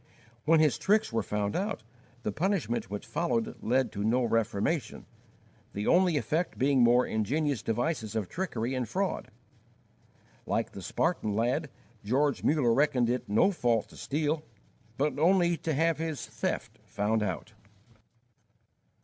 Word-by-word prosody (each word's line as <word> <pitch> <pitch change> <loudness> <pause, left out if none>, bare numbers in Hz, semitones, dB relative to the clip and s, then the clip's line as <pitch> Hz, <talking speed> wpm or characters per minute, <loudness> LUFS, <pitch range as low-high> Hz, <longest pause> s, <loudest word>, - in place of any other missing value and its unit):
When 160 +1 +5
his 155 -3 +3
tricks 210 - +2
were 115 - +2
found 105 0 -2
out, 195 - -2 0.4
the 105 - -1
punishment 155 - -1
which 105 +1 -5
followed 140 -10 -1
led 130 +2 +1
to 100 - -4
no 120 +4 +2
reformation, 115 +4 -1 0.7
the 105 +1 -3
only 180 -3 +4
effect 155 +8 -1
being 135 0 +3
more 120 +1 +5
ingenious 135 +4 0
devices 115 -1 -2
of 110 -4 -1
trickery 130 - -3
and 125 -4 -2
fraud. 190 +4 -2 1.2
Like - - -1
the - - -8
Spartan 105 -1 -1
lad, 125 +7 0 0.3
George 140 +7 +1
Muller 140 -6 +3
reckoned 125 -3 +2
it 125 -3 -3
no 110 - +4
fault 120 - 0
to - - -15
steal, 150 +2 -1 0.6
but 145 0 0
only 175 +1 +4
to 160 - -3
have 160 +1 +2
his 160 -3 -3
theft - - -4
found 105 +2 0
out. 105 +2 -3
130 Hz, 140 wpm, -29 LUFS, 110-160 Hz, 1.2 s, When